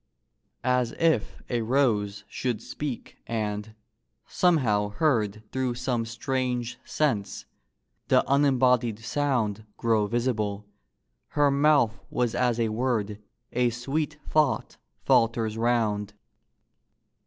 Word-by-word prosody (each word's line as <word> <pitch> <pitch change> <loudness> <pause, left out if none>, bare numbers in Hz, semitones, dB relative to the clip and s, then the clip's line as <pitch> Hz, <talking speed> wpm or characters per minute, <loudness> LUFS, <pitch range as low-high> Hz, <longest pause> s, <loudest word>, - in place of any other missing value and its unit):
As 125 -1 +1
if 160 -10 0
a 120 -2 -1
rose 110 -5 +1
should 125 -4 -2
speak 125 +2 -6
and, 110 -1 -3 0.5
somehow 120 - +2
heard 110 -4 0
Thro' 130 -2 -1
some 120 -2 -2
strange 125 0 -2
sense, 110 -10 -1 0.6
the - - +4
unembodied 130 -5 +3
sound 115 -4 -1
Grow 110 -3 +2
visible, 110 -4 -1 0.7
her 145 -1 +5
mouth 140 -5 +3
was 120 -2 0
as 120 -1 +1
a 115 -1 +1
word 110 -3 -1 0.3
A 125 0 +3
sweet 140 +6 -2
thought 150 -7 +1 0.3
falters 115 -1 +2
round. 110 -3 0
120 Hz, 100 wpm, -27 LUFS, 110-130 Hz, 0.7 s, her